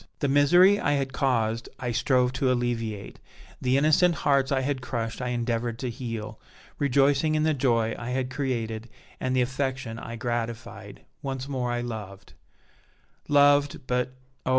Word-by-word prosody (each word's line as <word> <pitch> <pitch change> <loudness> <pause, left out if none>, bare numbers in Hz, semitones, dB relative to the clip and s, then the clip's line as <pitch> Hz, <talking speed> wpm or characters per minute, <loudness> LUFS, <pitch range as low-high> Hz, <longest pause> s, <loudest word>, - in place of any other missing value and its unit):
The 145 - 0
misery 175 +9 +5
I 145 - +1
had 135 -2 -1
caused 115 -4 0
I 125 -2 -2
strove 125 +1 +2
to 130 0 +1
alleviate, 115 -4 -2 0.4
the 130 +1 +2
innocent 155 +4 +4
hearts 140 -2 +2
I 135 -1 +2
had 135 -1 -2
crushed 115 -1 -4
I 125 - -2
endeavored 120 -1 -1
to 125 0 -3
heal; 115 -3 -6 0.4
rejoicing 140 +2 +3
in 155 - +2
the 155 0 +3
joy 115 -5 +1
I 120 - -5
had 130 0 -2
created 115 -5 -3 0.3
and 130 0 -1
the 130 - +3
affection 130 -3 -3
I 115 - -7
gratified, 120 0 -5 0.2
once 135 -1 -4
more 125 -3 -2
I 120 0 -1
loved 105 -5 -7 0.9
loved, 145 -1 +4
but, 125 0 -1 0.3
oh! - - -3
125 Hz, 155 wpm, -26 LUFS, 115-140 Hz, 0.9 s, misery